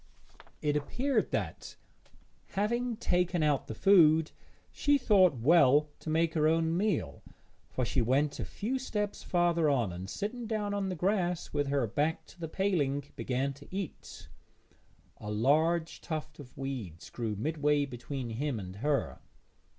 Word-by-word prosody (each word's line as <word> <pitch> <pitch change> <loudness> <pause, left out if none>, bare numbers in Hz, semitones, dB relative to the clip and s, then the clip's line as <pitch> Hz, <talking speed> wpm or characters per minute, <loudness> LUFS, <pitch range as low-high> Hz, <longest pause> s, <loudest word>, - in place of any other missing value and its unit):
It 150 -1 +1
appeared 245 - 0
that, - - -4 0.8
having 235 +4 0
taken 180 -3 +1
out 145 -3 +1
the 110 - -5
food, 160 - +5 0.4
she 290 0 +2
thought 195 - +4
well 150 +2 +5
to - - -7
make 160 +1 +1
her 155 -1 +3
own 165 +1 +2
meal, 170 - -1 0.5
for 130 - -1
she 125 +2 0
went 135 +5 +1
a - - -1
few 255 +6 -3
steps 210 -5 -3
farther 170 -3 +2
on, 120 -10 +1
and, 95 +2 -7
sitting 230 - -4
down 210 -2 -2
on 200 -1 -1
the 185 - -3
grass 180 -1 -1
with 145 -1 0
her 140 -3 +1
back 145 +9 -1
to - - -18
the 165 - -4
paling, 155 -8 0
began 135 +2 -1
to 145 +1 -15
eat. 190 -4 -7 0.9
A 105 - -7
large 155 +10 +1
tuft 155 -2 -5
of 130 -3 -12
weeds 125 -12 -6
grew 115 -3 -3
midway 150 +4 +1
between 125 -1 -6
him 130 +1 -2
and 95 -1 -8
her. 145 +5 -1
155 Hz, 150 wpm, -31 LUFS, 135-185 Hz, 0.9 s, food